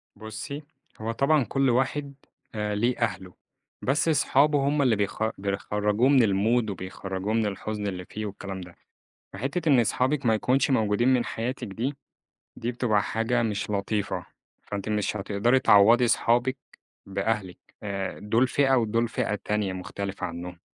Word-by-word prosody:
بُصّي، 135 +7 -7 0.4
هو 110 +1 -2
طبعًا 140 +4 +3
كل 135 +2 +1
واحد 135 +3 0 0.4
آآ، 105 -1 -1
ليه 120 +4 +1
أهله، 95 -5 -2 0.5
بس 140 +5 +1
أصحابه 145 -2 +3
هم 145 0 +2
اللي 125 -5 +3
بيخ 100 +1 -1
بيخرّجوه 105 +4 0
من 135 -3 +6
المود 110 +3 +2
وبيخرّجوه 95 +1 -4
من 115 -1 +2
الحزن 105 +1 -3
اللي 90 -2 -4
فيه 110 +3 -6
والكلام 100 -1 -6
ده، 90 -1 -11 0.6
فحتّة 145 +6 -2
إن 135 -4 +6
أصحابِك 130 +4 0
ما 110 - +4
يكونش 130 +6 +1
موجودين 110 -1 +2
من 120 -2 +2
حياتِك 120 +2 -4
دي، 120 +8 -3 0.6
دي 120 - -3
بتبقى 115 -4 +1
حاجة 115 +2 0
مش 105 -2 -2
لطيفة، 105 0 -2 0.4
فأنتِ 100 +1 -5
مش 105 0 0
هتقدري 105 +6 +2
تعوّضي 115 +1 +6
أصحابِك 120 +3 +2 0.5
بأهلِك، 100 -1 -2 0.3
آآ، 100 -2 -4
دُولْ 115 +5 +2
فئة 135 0 +3
ودُولْ 115 -1 +1
فئة 110 -1 -1
تانية 105 -3 0
مختلفة 95 +2 -5
عنهم. 85 +1 -7
110 Hz, 150 wpm, -26 LUFS, 100-130 Hz, 0.6 s, من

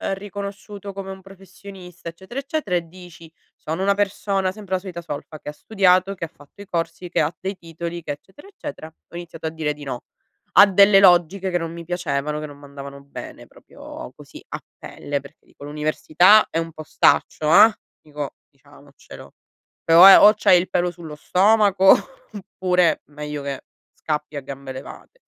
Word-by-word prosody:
riconosciuto 200 0 -8
come 195 0 -7
un 190 - -10
professionista, 190 -2 -12
eccetera, 190 +10 -8
eccetera, 275 - -3
e 170 -1 -2
dici: 170 -2 -14 0.2
"Sono 160 +4 -5
una 200 +1 +3
persona- 195 -1 -1
sempre 200 -1 -8
la - - -1
solita 180 -2 -8
solfa- 155 -1 -8
che - - -8
ha - - -4
studiato, 185 +1 +2
che 175 - -5
ha - - -9
fatto 145 +6 -18
i 200 - -11
corsi, 175 +1 -4
che - - +1
ha 155 +2 -1
dei 195 +1 -4
titoli 170 0 -7
che, 150 - -4
eccetera, 190 - -12
eccetera" 300 - -9
ho 160 +1 -19
iniziato 170 -2 -9
a - - -1
dire 155 -2 -3
di 145 0 -12
no 130 -3 -6 0.5
a 200 - +9
delle 200 +1 +6
logiche 185 +1 +4
che 175 - 0
non 165 -1 -5
mi 170 0 -8
piacevano, 150 -4 -3
che 155 - -6
non 145 -1 -11
m'andavano 140 -1 -10
bene, 140 - -10
proprio - - -12
così - - -14
a - - -6 0.2
pelle, 145 0 -5
perché, 140 +3 -18
dico, - - -16
l'università 155 +7 +3
è 165 - -1
un 165 0 -4
postaccio, 155 0 +1
ehm, 220 +6 +7 0.3
dico 150 -2 -7 0.2
diciamocelo - - -16 0.5
o 165 +2 +8
è 195 - +10
o 210 - +8
c'hai 185 -3 +5
il 180 - -4
pelo 175 0 0
sullo 165 -3 -10
stomaco 195 +3 +4 0.4
oppure, 180 -4 0
meglio 150 0 -7
che 140 -1 -5 0.3
scappi 150 -1 -4
a - - -4
gambe 135 0 -8
levate. 135 - -11
175 Hz, 180 wpm, -21 LUFS, 150-195 Hz, 0.5 s, è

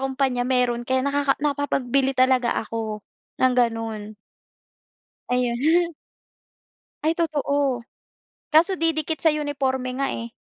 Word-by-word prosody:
kumpanya 265 -2 0
meron 245 -2 +1
kaya 260 0 +1
nakaka 280 -1 +1
nakapag-bili 275 -2 0
talaga 255 -1 +3
ako 220 -2 -5 0.4
ng 255 0 +5
ganun. 225 -3 -1 1.1
Ayun. 255 +8 +2 1.1
Ay 320 +1 +2
totoo. 285 -5 0 0.7
Kaso 325 +5 +4
didikit 320 -2 0
sa 325 - +4
uniporme 275 -4 -1
nga, 275 - +1
eh 230 -2 -5
265 Hz, 105 wpm, -23 LUFS, 245-290 Hz, 1.1 s, ng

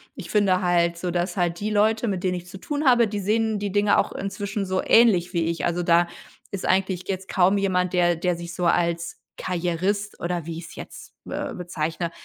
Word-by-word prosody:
ich - - -8
finde 195 -3 +3
halt 170 -1 +2
so, 175 +1 -3
dass 175 +3 -2
halt 175 0 0
die 210 - -1
Leute, 220 +2 +2
mit 185 -3 -3
denen 180 -1 +1
ich 175 0 -7
zu 190 - -9
tun 295 +8 -3
habe, 240 -3 +5
die 205 -1 -4
sehen 220 +2 +1
die 200 -1 -3
Dinge 205 +1 +3
auch - - +1
inzwischen 200 +1 -4
so 185 0 0
ähnlich 210 -7 +5
wie 170 -2 0
ich. 170 0 -1
Also, 175 0 0
da 170 0 +4 0.4
ist 195 - -4
eigentlich 185 -1 +1
jetzt 190 -1 -4
kaum 190 +2 +3
jemand, 185 -2 0
der 175 -1 +3
der 180 +1 0
sich 170 0 -7
so 180 -1 -2
als 170 0 0 0.2
Karrierist 185 +4 -2
oder 170 -2 -3
wie 165 -1 -5
ich's 165 0 -9
jetzt, - - -10
äh, - - -4
bezeichne, 170 -1 -3
180 Hz, 210 wpm, -24 LUFS, 175-200 Hz, 0.4 s, habe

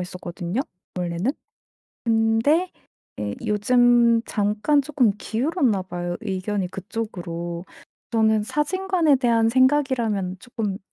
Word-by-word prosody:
했었거든요 180 +3 -4 0.4
원래는. 175 +7 -1 0.7
근데 230 +10 +2 0.5
예 105 -1 -2
요즘 235 +2 +4
잠깐 210 +8 +1
쪼끔 265 -7 +2
기울었나 245 - 0
봐요, 175 -1 -4
의견이 195 -2 -2
그쪽으로. 175 -4 -5 0.5
저는 220 -1 +3
사진관에 335 - +1
대한 230 -3 +2
생각이라면 250 -7 +2
쪼끔 220 -4 -4
그 - - -10
225 Hz, 255 characters per minute, -23 LUFS, 185-260 Hz, 0.7 s, 요즘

